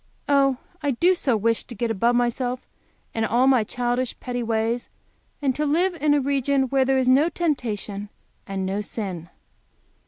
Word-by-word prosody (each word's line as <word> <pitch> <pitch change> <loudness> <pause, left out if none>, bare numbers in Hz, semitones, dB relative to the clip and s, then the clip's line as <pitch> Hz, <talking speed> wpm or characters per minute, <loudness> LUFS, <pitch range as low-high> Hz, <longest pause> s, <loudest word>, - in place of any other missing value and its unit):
Oh, 275 -2 +3 0.2
I 290 - 0
do 340 +8 +3
so 265 -10 +1
wish 230 +2 +1
to 240 - -9
get 230 +2 -1
above 235 +3 +2
myself 245 +1 -1 0.5
and 225 - -1
all 240 +3 +3
my 260 -4 +4
childish, 245 +2 -2
petty 245 -1 -3
ways, 230 +1 -1 0.5
and 270 -2 +2
to 300 - -1
live 340 +6 +2
in 295 -1 +4
a - - +3
region 275 0 +1
where 270 0 +2
there 265 0 +2
is 260 -1 +1
no 275 +6 +5
temptation 220 - -2 0.4
and 195 -1 -3
no 195 +2 -1
sin! 190 -6 -5
245 Hz, 175 wpm, -24 LUFS, 225-275 Hz, 0.5 s, no